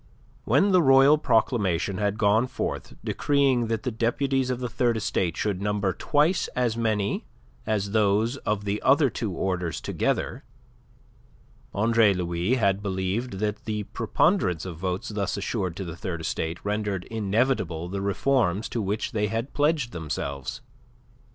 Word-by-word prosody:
When 200 Hz, 0 st, +3 dB
the 185 Hz, -1 st, +5 dB
royal 135 Hz, +1 st, +6 dB
proclamation 105 Hz, -, +1 dB
had 105 Hz, 0 st, 0 dB
gone 110 Hz, +2 st, +3 dB
forth -, -, -4 dB
decreeing 135 Hz, -5 st, +2 dB
that 115 Hz, -1 st, -2 dB
the 125 Hz, -, -1 dB
deputies 130 Hz, +3 st, 0 dB
of 125 Hz, -1 st, -1 dB
the 125 Hz, -, -2 dB
Third 120 Hz, 0 st, +1 dB
Estate 90 Hz, -5 st, -1 dB
should 100 Hz, -3 st, -1 dB
number 100 Hz, -2 st, 0 dB
twice 150 Hz, -, +1 dB
as 120 Hz, -3 st, +1 dB
many 110 Hz, -3 st, -1 dB, 0.4 s
as 100 Hz, -2 st, 0 dB
those 110 Hz, +4 st, +2 dB
of 105 Hz, -5 st, -2 dB
the 100 Hz, +1 st, -1 dB
other 140 Hz, 0 st, +4 dB
two 110 Hz, -4 st, -3 dB
orders 90 Hz, -2 st, -2 dB
together, -, -, -2 dB, 1.3 s
Andre 110 Hz, -1 st, +4 dB
Louis 90 Hz, +5 st, 0 dB
had 100 Hz, -5 st, +1 dB
believed 100 Hz, +4 st, -2 dB
that 105 Hz, +2 st, -3 dB
the 105 Hz, -1 st, -2 dB
preponderance 90 Hz, -3 st, +1 dB
of 90 Hz, -4 st, -6 dB
votes 90 Hz, +1 st, -3 dB
thus 100 Hz, -2 st, -2 dB
assured 95 Hz, -3 st, -2 dB
to 95 Hz, -, -4 dB
the 85 Hz, -1 st, -6 dB
Third 90 Hz, -3 st, -5 dB
Estate 80 Hz, +2 st, -3 dB
rendered 105 Hz, -3 st, -1 dB
inevitable 105 Hz, -6 st, 0 dB
the 100 Hz, +2 st, -4 dB
reforms 105 Hz, -1 st, +1 dB
to 115 Hz, -, -2 dB
which 105 Hz, +4 st, -2 dB
they 105 Hz, -3 st, 0 dB
had 115 Hz, +5 st, -3 dB
pledged 145 Hz, -4 st, +1 dB
themselves. 70 Hz, -5 st, -4 dB
105 Hz, 150 wpm, -26 LUFS, 95-120 Hz, 1.3 s, royal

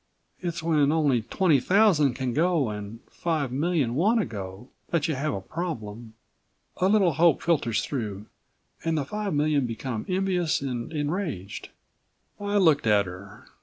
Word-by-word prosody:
"It's 170 Hz, -2 st, -4 dB
when 150 Hz, -3 st, +3 dB
only 145 Hz, -7 st, +2 dB
twenty 150 Hz, -, +2 dB
thousand 170 Hz, -, +4 dB
can 130 Hz, -2 st, -2 dB
go 160 Hz, -4 st, +2 dB
and 105 Hz, +2 st, -7 dB
five 155 Hz, -6 st, -1 dB
million 145 Hz, -3 st, 0 dB
want 205 Hz, -, +3 dB
to 210 Hz, -, +1 dB
go 100 Hz, +3 st, -8 dB, 0.2 s
that 170 Hz, -3 st, +1 dB
you 160 Hz, -, 0 dB
have 145 Hz, +3 st, -1 dB
a 95 Hz, -, -4 dB
problem. 115 Hz, -, -6 dB, 0.6 s
A 185 Hz, -, +2 dB
little 195 Hz, -5 st, +4 dB
hope 165 Hz, 0 st, +3 dB
filters 140 Hz, -10 st, +1 dB
through, 105 Hz, -7 st, -4 dB, 0.6 s
and 165 Hz, -1 st, 0 dB
the 145 Hz, -, -1 dB
five 210 Hz, +1 st, -3 dB
million 145 Hz, -3 st, +2 dB
become 115 Hz, -1 st, -4 dB
envious 185 Hz, -3 st, +1 dB
and 125 Hz, -2 st, -4 dB
enraged." 150 Hz, -, -3 dB, 0.7 s
I 205 Hz, 0 st, -1 dB
looked 155 Hz, -, +4 dB
at 105 Hz, -2 st, +4 dB
her. 95 Hz, +3 st, -10 dB
145 Hz, 155 wpm, -26 LUFS, 115-170 Hz, 0.7 s, thousand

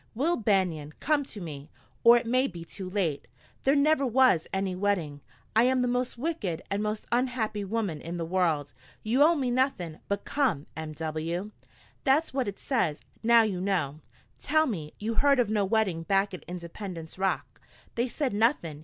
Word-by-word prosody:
"'Will 310 Hz, +9 st, +2 dB
Banion, 180 Hz, -9 st, 0 dB
come 295 Hz, -1 st, +2 dB
to 220 Hz, -, -9 dB
me, 150 Hz, -5 st, -7 dB, 0.3 s
or 235 Hz, +1 st, +9 dB
it 235 Hz, -, -2 dB
may 255 Hz, +3 st, +2 dB
be 170 Hz, -3 st, -8 dB
too 185 Hz, +2 st, -7 dB
late. 180 Hz, -7 st, -1 dB, 0.4 s
There 275 Hz, +2 st, +4 dB
never 295 Hz, 0 st, +3 dB
was 255 Hz, -9 st, +4 dB
any 190 Hz, -1 st, -1 dB
wedding. 180 Hz, -7 st, -1 dB, 0.3 s
I 225 Hz, +2 st, +6 dB
am 255 Hz, 0 st, +3 dB
the -, -, +1 dB
most 245 Hz, 0 st, -1 dB
wicked 235 Hz, -, -3 dB
and 200 Hz, +1 st, 0 dB
most 215 Hz, 0 st, -2 dB
unhappy 240 Hz, -4 st, 0 dB
woman 200 Hz, -6 st, -2 dB
in 170 Hz, +2 st, -5 dB
the 165 Hz, -, -2 dB
world. 160 Hz, -5 st, 0 dB, 0.3 s
You 235 Hz, +6 st, +1 dB
owe 325 Hz, +3 st, +6 dB
me 260 Hz, -5 st, 0 dB
nothing! 240 Hz, -, 0 dB
But 200 Hz, 0 st, -2 dB
come! 255 Hz, -, 0 dB
M.W.' 160 Hz, +4 st, -4 dB, 0.5 s
"That's 295 Hz, +3 st, +2 dB
what 265 Hz, -4 st, 0 dB
it 200 Hz, -, -4 dB
says. 180 Hz, -, -1 dB, 0.2 s
Now 230 Hz, 0 st, +6 dB
you 195 Hz, -5 st, -2 dB
know. 165 Hz, -7 st, -1 dB, 0.4 s
Tell 310 Hz, +3 st, +3 dB
me 165 Hz, -, -4 dB
you 220 Hz, +2 st, -2 dB
heard 280 Hz, +2 st, +4 dB
of 230 Hz, -4 st, +2 dB
no 210 Hz, -2 st, +2 dB
wedding 195 Hz, -5 st, +1 dB
back 195 Hz, +3 st, +1 dB
at 185 Hz, -, -8 dB
Independence 175 Hz, -1 st, -7 dB
Rock? 190 Hz, 0 st, -2 dB, 0.3 s
They 240 Hz, +2 st, 0 dB
said 265 Hz, 0 st, -2 dB
nothing? 205 Hz, -, +1 dB
205 Hz, 180 wpm, -28 LUFS, 170-250 Hz, 0.5 s, or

